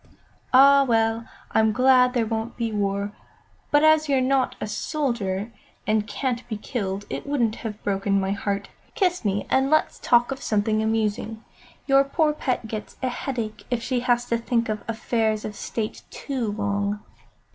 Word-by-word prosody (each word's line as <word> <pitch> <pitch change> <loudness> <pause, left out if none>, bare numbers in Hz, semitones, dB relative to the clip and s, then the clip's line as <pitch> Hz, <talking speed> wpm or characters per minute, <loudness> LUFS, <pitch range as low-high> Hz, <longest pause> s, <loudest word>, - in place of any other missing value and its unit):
"Ah, 275 +2 +7
well, 225 -2 +1 0.2
I'm 220 0 +3
glad 255 +2 +4
there 235 -2 +2
won't 225 +1 -3
be 230 -2 -1
war; 200 0 -1 0.6
but 290 +1 +4
as 310 -1 +5
you're 270 -2 +3
not 260 0 +1
a - - -3
soldier, 215 - -2 0.3
and 215 0 +1
can't 240 +3 -3
be 215 - -3
killed, 205 -3 -4
it - - -5
wouldn't 240 -6 0
have 215 -2 -7
broken 195 0 +1
my 190 0 -1
heart. 200 0 -2 0.3
Kiss 360 - +1
me 200 -1 0
and 265 +1 +3
let's 310 +1 +2
talk 240 +1 +3
of 270 - -4
something 215 0 +1
amusing. 220 0 -1 0.4
Your 275 0 +5
poor 300 +2 +1
pet 255 -5 -2
gets 215 -1 -6
a 255 - +1
headache 235 -4 -4
if 240 -2 -1
she 255 -1 0
has 240 0 +1
to 235 - +1
think 230 -1 0
of 215 -1 -2
affairs 220 -1 0
of 210 - -5
State 215 +1 -4
too 255 -7 -3
long." 205 0 -1
225 Hz, 170 wpm, -24 LUFS, 210-255 Hz, 0.6 s, Ah